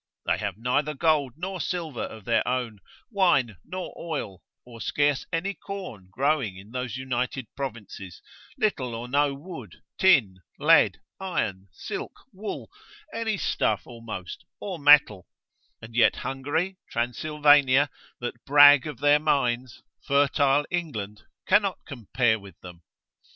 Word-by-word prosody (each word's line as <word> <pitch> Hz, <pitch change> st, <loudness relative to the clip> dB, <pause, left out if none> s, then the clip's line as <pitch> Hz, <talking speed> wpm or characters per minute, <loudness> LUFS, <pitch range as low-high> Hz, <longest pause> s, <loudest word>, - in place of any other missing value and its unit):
They -, -, +1 dB
have 100 Hz, -2 st, -4 dB
neither 140 Hz, +6 st, 0 dB
gold 150 Hz, -4 st, +1 dB
nor 185 Hz, +2 st, -4 dB
silver 165 Hz, -8 st, -3 dB
of 110 Hz, -3 st, -7 dB
their 115 Hz, -, +2 dB
own, 125 Hz, -4 st, -2 dB, 0.3 s
wine 140 Hz, -, +2 dB
nor 185 Hz, -1 st, -6 dB
oil, 125 Hz, -, -5 dB, 0.2 s
or 115 Hz, -2 st, -12 dB
scarce 145 Hz, -2 st, 0 dB
any 180 Hz, +4 st, -1 dB
corn 185 Hz, -, -8 dB
growing 130 Hz, -3 st, 0 dB
in 100 Hz, +3 st, -13 dB
those 125 Hz, -2 st, -4 dB
united 130 Hz, 0 st, -3 dB
provinces, 105 Hz, -9 st, -7 dB, 0.4 s
little 130 Hz, -, -1 dB
or 120 Hz, +2 st, -6 dB
no 140 Hz, +2 st, +1 dB
wood, 140 Hz, -, -10 dB, 0.2 s
tin, 125 Hz, -, +4 dB, 0.2 s
lead, -, -, +5 dB, 0.2 s
iron, 100 Hz, -, -3 dB
silk, -, -, -6 dB, 0.2 s
wool, 205 Hz, +3 st, -6 dB, 0.4 s
any 225 Hz, -2 st, -1 dB
stuff 105 Hz, -, 0 dB
almost, 115 Hz, -7 st, -8 dB, 0.2 s
or 190 Hz, -5 st, -5 dB
metal; 145 Hz, -10 st, +5 dB, 0.6 s
and 115 Hz, 0 st, -11 dB
yet 120 Hz, -, +4 dB
Hungary, 155 Hz, +8 st, -2 dB
Transylvania, 145 Hz, +2 st, +3 dB, 0.3 s
that 120 Hz, -1 st, -6 dB
brag 145 Hz, 0 st, +7 dB
of 145 Hz, -5 st, -8 dB
their 145 Hz, 0 st, +5 dB
mines, 130 Hz, -5 st, -1 dB, 0.2 s
fertile 140 Hz, 0 st, +2 dB
England 110 Hz, -, -4 dB, 0.2 s
cannot 200 Hz, -1 st, +3 dB
compare 120 Hz, -3 st, 0 dB
with 100 Hz, -4 st, -14 dB
them. 90 Hz, -2 st, -11 dB
135 Hz, 130 wpm, -26 LUFS, 115-155 Hz, 0.6 s, brag